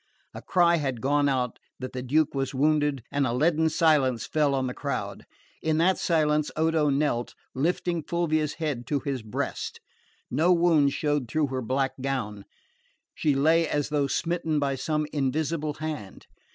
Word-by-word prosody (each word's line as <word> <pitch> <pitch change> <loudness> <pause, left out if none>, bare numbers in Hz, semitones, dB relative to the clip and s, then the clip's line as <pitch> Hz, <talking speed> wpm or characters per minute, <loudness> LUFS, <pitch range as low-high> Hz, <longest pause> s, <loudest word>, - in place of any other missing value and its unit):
A - - -8
cry 170 -2 +3
had 135 -6 -2
gone 145 +3 +2
out 125 -3 -1 0.2
that 130 0 -7
the 130 - -4
Duke 145 +4 +1
was 135 0 -2
wounded, 145 -2 +1
and 140 -2 +1
a 115 - -1
leaden 160 +4 +2
silence 150 -8 +2
fell 150 -3 +1
on 130 -1 0
the 125 - -3
crowd. - - -4 0.4
In 155 -1 +1
that 180 +3 +3
silence 150 -2 +1
Odo 160 -1 +2
knelt, 135 -4 0 0.2
lifting 170 +4 0
Fulvia's 155 -2 -1
head 145 -7 -3
to 145 -2 0
his 135 -3 -3
breast. 110 -1 -4 0.5
No 170 +4 +3
wound 165 -5 +4
showed 145 -4 -1
through 155 -3 0
her 130 -1 -2
black 135 +3 0
gown. 110 -7 -3 0.7
She 150 -3 +1
lay 160 +4 +3
as 145 -1 -1
though 145 -2 +1
smitten 165 +1 -1
by 140 -1 +1
some 150 +3 -1
invisible 150 +2 -1
hand. 150 -11 -6
145 Hz, 165 wpm, -26 LUFS, 135-155 Hz, 0.7 s, wound